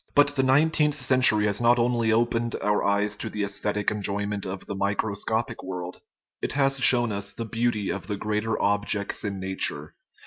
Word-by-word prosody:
But 145 Hz, 0 st, +4 dB
the 135 Hz, -, +2 dB
nineteenth 150 Hz, +2 st, +2 dB
century 125 Hz, -5 st, +4 dB
has 100 Hz, +1 st, 0 dB
not 120 Hz, +1 st, +4 dB
only 120 Hz, -1 st, +1 dB
opened 120 Hz, +1 st, 0 dB
our 105 Hz, 0 st, 0 dB
eyes 100 Hz, +1 st, +1 dB
to -, -, -5 dB
the 105 Hz, -, -3 dB
aesthetic 105 Hz, +1 st, -2 dB
enjoyment 100 Hz, -1 st, -2 dB
of 95 Hz, 0 st, -6 dB
the -, -, -5 dB
microscopic 100 Hz, +3 st, -2 dB
world; 90 Hz, -1 st, -7 dB, 0.4 s
it -, -, -2 dB
has 135 Hz, 0 st, +1 dB
shown 120 Hz, -3 st, +5 dB
us 100 Hz, 0 st, -4 dB
the 115 Hz, -, -5 dB
beauty 115 Hz, -2 st, -1 dB
of -, -, -6 dB
the 105 Hz, -2 st, -3 dB
greater 105 Hz, +2 st, -2 dB
objects 100 Hz, 0 st, 0 dB
in 100 Hz, -2 st, -4 dB
nature. 95 Hz, -6 st, -2 dB
105 Hz, 175 wpm, -25 LUFS, 100-120 Hz, 0.4 s, shown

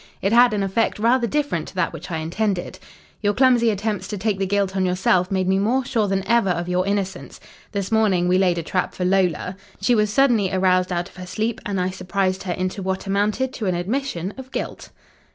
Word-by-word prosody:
It 195 Hz, +3 st, 0 dB
had 240 Hz, +1 st, +6 dB
an 205 Hz, -2 st, 0 dB
effect 195 Hz, +4 st, 0 dB
rather 235 Hz, +3 st, +2 dB
different 290 Hz, -, -1 dB
to -, -, -11 dB
that 180 Hz, -2 st, 0 dB
which 165 Hz, +4 st, -8 dB
I 165 Hz, -, -2 dB
intended. 180 Hz, +4 st, -2 dB, 0.4 s
"Your 205 Hz, -1 st, +1 dB
clumsy 245 Hz, -2 st, +4 dB
attempts 205 Hz, -2 st, -2 dB
to 210 Hz, -, -4 dB
take 200 Hz, 0 st, -1 dB
the 195 Hz, -, 0 dB
guilt 200 Hz, -1 st, 0 dB
on 190 Hz, -, +1 dB
yourself 180 Hz, 0 st, +2 dB
made 190 Hz, -1 st, 0 dB
me 190 Hz, +1 st, +2 dB
more 245 Hz, +6 st, +1 dB
sure 225 Hz, -5 st, 0 dB
than 195 Hz, -1 st, -1 dB
ever 235 Hz, -4 st, +3 dB
of 175 Hz, 0 st, -1 dB
your 180 Hz, +1 st, 0 dB
innocence. 200 Hz, -1 st, -3 dB, 0.3 s
This 200 Hz, -1 st, -3 dB
morning 200 Hz, -5 st, +3 dB
we 180 Hz, +1 st, +3 dB
laid 180 Hz, -2 st, +2 dB
a 170 Hz, -, -2 dB
trap 185 Hz, +3 st, -2 dB
for 180 Hz, -, -2 dB
Lola. 185 Hz, -1 st, +1 dB, 0.2 s
She 205 Hz, +5 st, +2 dB
was 210 Hz, -2 st, +2 dB
suddenly 230 Hz, -6 st, +3 dB
aroused 185 Hz, -1 st, +2 dB
out 175 Hz, 0 st, -1 dB
of -, -, -18 dB
her 180 Hz, 0 st, -8 dB
sleep, 220 Hz, +4 st, -2 dB
and 200 Hz, -2 st, -1 dB
I 180 Hz, +1 st, 0 dB
surprised 185 Hz, 0 st, -1 dB
her 180 Hz, -2 st, -2 dB
into 185 Hz, +2 st, -3 dB
what 190 Hz, 0 st, -3 dB
amounted 210 Hz, +6 st, 0 dB
to 215 Hz, -, -3 dB
an 180 Hz, -, +1 dB
admission 195 Hz, -1 st, -2 dB
of 265 Hz, 0 st, -10 dB
guilt." -, -, -5 dB
195 Hz, 225 wpm, -22 LUFS, 185-220 Hz, 0.4 s, had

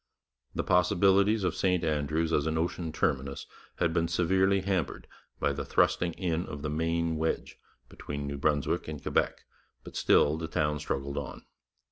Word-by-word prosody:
The -, -, 0 dB
possibilities 95 Hz, +4 st, +3 dB
of 90 Hz, -2 st, +1 dB
St 90 Hz, -2 st, +1 dB
Andrews 80 Hz, +1 st, 0 dB
as 75 Hz, +1 st, +2 dB
an 80 Hz, 0 st, 0 dB
ocean 85 Hz, 0 st, -2 dB
terminus 70 Hz, -3 st, -1 dB, 0.3 s
had 80 Hz, -, 0 dB
been 85 Hz, -1 st, +1 dB
severely 95 Hz, +3 st, +2 dB
hampered 95 Hz, -3 st, -2 dB, 0.3 s
by -, -, +1 dB
the -, -, -4 dB
thrusting 85 Hz, -1 st, +2 dB
in 85 Hz, -1 st, -2 dB
of 75 Hz, 0 st, -7 dB
the 75 Hz, -, -2 dB
Maine 80 Hz, +1 st, 0 dB
wedge 80 Hz, +1 st, -2 dB, 0.3 s
between 70 Hz, 0 st, -6 dB
New 70 Hz, 0 st, -4 dB
Brunswick 75 Hz, -1 st, 0 dB
and 75 Hz, -2 st, -5 dB
Quebec, -, -, -1 dB, 0.4 s
but -, -, -11 dB
still 75 Hz, +2 st, +3 dB
the 80 Hz, -, -3 dB
town 75 Hz, -2 st, 0 dB
struggled 70 Hz, +1 st, -3 dB
on. 70 Hz, -, -8 dB
80 Hz, 160 wpm, -29 LUFS, 75-90 Hz, 0.4 s, possibilities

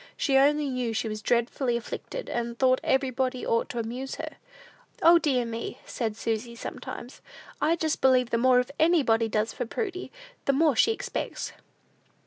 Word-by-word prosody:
She 275 Hz, -, +1 dB
only 290 Hz, +2 st, +4 dB
knew 250 Hz, -3 st, -1 dB
she 225 Hz, -, -1 dB
was 215 Hz, -1 st, -4 dB
dreadfully 240 Hz, +2 st, +1 dB
afflicted, -, -, -6 dB
and 235 Hz, 0 st, -3 dB
thought 255 Hz, 0 st, +3 dB
everybody 260 Hz, -1 st, 0 dB
ought 230 Hz, -, +1 dB
to 240 Hz, -, -6 dB
amuse 245 Hz, +4 st, -4 dB
her. -, -, -7 dB, 0.7 s
"O, 340 Hz, +1 st, +8 dB
dear 260 Hz, -7 st, +1 dB
me!" 230 Hz, 0 st, -5 dB
said 220 Hz, -3 st, -3 dB
Susy, 230 Hz, +1 st, -2 dB
sometimes, 240 Hz, +1 st, -8 dB, 0.4 s
"I 315 Hz, +3 st, +3 dB
just 320 Hz, -2 st, -1 dB
believe 255 Hz, -2 st, +4 dB
the 230 Hz, -, +2 dB
more 250 Hz, 0 st, +4 dB
anybody 265 Hz, -9 st, +3 dB
does 215 Hz, +1 st, 0 dB
for 245 Hz, -, -4 dB
Prudy, 375 Hz, -, -4 dB, 0.3 s
the 275 Hz, -, +3 dB
more 300 Hz, -1 st, +3 dB
she 450 Hz, -, +4 dB
expects." 445 Hz, -, -4 dB
250 Hz, 160 wpm, -27 LUFS, 230-280 Hz, 0.7 s, O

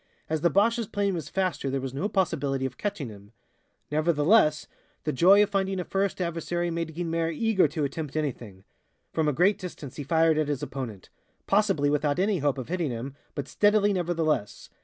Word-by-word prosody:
As 160 Hz, -1 st, 0 dB
the 170 Hz, -, +4 dB
Boche's 225 Hz, +5 st, +2 dB
plane 200 Hz, -1 st, 0 dB
was 165 Hz, -6 st, -4 dB
faster 180 Hz, -8 st, -1 dB
there 135 Hz, +1 st, -1 dB
was 130 Hz, -1 st, -5 dB
no 180 Hz, +10 st, -2 dB
possibility 145 Hz, -9 st, 0 dB
of 130 Hz, -1 st, -4 dB
catching 200 Hz, -, -3 dB
him. 100 Hz, 0 st, -14 dB, 0.6 s
Nevertheless, 155 Hz, +1 st, +3 dB, 0.4 s
the 150 Hz, -, -1 dB
joy 195 Hz, +9 st, +6 dB
of 205 Hz, -, -2 dB
finding 195 Hz, -1 st, 0 dB
a -, -, -1 dB
first 195 Hz, 0 st, -1 dB
adversary 175 Hz, 0 st, -2 dB
made 165 Hz, -1 st, -3 dB
Guynemer 165 Hz, -1 st, -1 dB
eager 195 Hz, +1 st, +2 dB
to 150 Hz, +1 st, -3 dB
attempt 145 Hz, +1 st, -4 dB
anything. 120 Hz, -11 st, -4 dB, 0.5 s
From 160 Hz, -1 st, +1 dB
a -, -, +3 dB
great 190 Hz, +8 st, +3 dB
distance 160 Hz, -8 st, -8 dB
he 145 Hz, -, -4 dB
fired 160 Hz, +1 st, +3 dB
at 155 Hz, -, +1 dB
his 145 Hz, -1 st, -2 dB
opponent 125 Hz, -9 st, -6 dB, 0.3 s
possibly 195 Hz, -8 st, +2 dB
without 150 Hz, 0 st, +1 dB
any 195 Hz, 0 st, +1 dB
hope 145 Hz, -1 st, 0 dB
of 130 Hz, -, -5 dB
hitting 175 Hz, -4 st, -1 dB
him, 125 Hz, +3 st, -5 dB, 0.2 s
but 140 Hz, -2 st, -4 dB
steadily 205 Hz, +3 st, +3 dB
nevertheless. 165 Hz, -, -1 dB
160 Hz, 185 wpm, -27 LUFS, 145-190 Hz, 0.6 s, joy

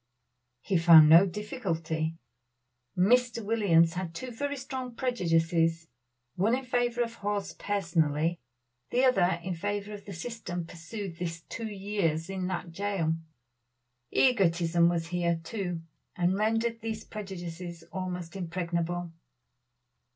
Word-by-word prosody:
He 185 Hz, +4 st, +1 dB
found 165 Hz, -2 st, +9 dB
no 170 Hz, +5 st, +8 dB
difficulty. 165 Hz, -6 st, -3 dB, 0.8 s
Mr. 230 Hz, +3 st, +3 dB
Williams 175 Hz, -7 st, +4 dB
had 175 Hz, -2 st, -4 dB
two 255 Hz, +7 st, -5 dB
very 285 Hz, +4 st, -3 dB
strong 260 Hz, -2 st, -5 dB
prejudices, 165 Hz, -8 st, +1 dB, 0.4 s
one 210 Hz, -, +2 dB
in 265 Hz, -, -7 dB
favor 245 Hz, -1 st, +1 dB
of 230 Hz, -1 st, -5 dB
Hawes 205 Hz, -2 st, -3 dB
personally, 165 Hz, -4 st, 0 dB, 0.5 s
the 250 Hz, -, +2 dB
other 190 Hz, -9 st, +3 dB
in 185 Hz, +1 st, -2 dB
favor 205 Hz, +4 st, -3 dB
of 205 Hz, -1 st, -9 dB
the 200 Hz, -, -7 dB
system 180 Hz, -3 st, -5 dB
pursued 170 Hz, +2 st, -7 dB
this 165 Hz, -1 st, -4 dB
two 225 Hz, +6 st, -6 dB
years 195 Hz, -5 st, -1 dB
in 185 Hz, -1 st, -2 dB
that 180 Hz, -2 st, -4 dB
jail. 190 Hz, -3 st, 0 dB, 1.0 s
Egotism 170 Hz, -8 st, +3 dB
was 165 Hz, -1 st, -1 dB
here, 170 Hz, -1 st, 0 dB
too, 175 Hz, -4 st, -4 dB, 0.3 s
and 180 Hz, 0 st, +2 dB
rendered 225 Hz, +3 st, 0 dB
these 220 Hz, 0 st, -4 dB
prejudices 175 Hz, -4 st, -7 dB
almost 180 Hz, -2 st, -4 dB
impregnable. 175 Hz, -1 st, -2 dB
185 Hz, 120 wpm, -29 LUFS, 170-215 Hz, 1.0 s, found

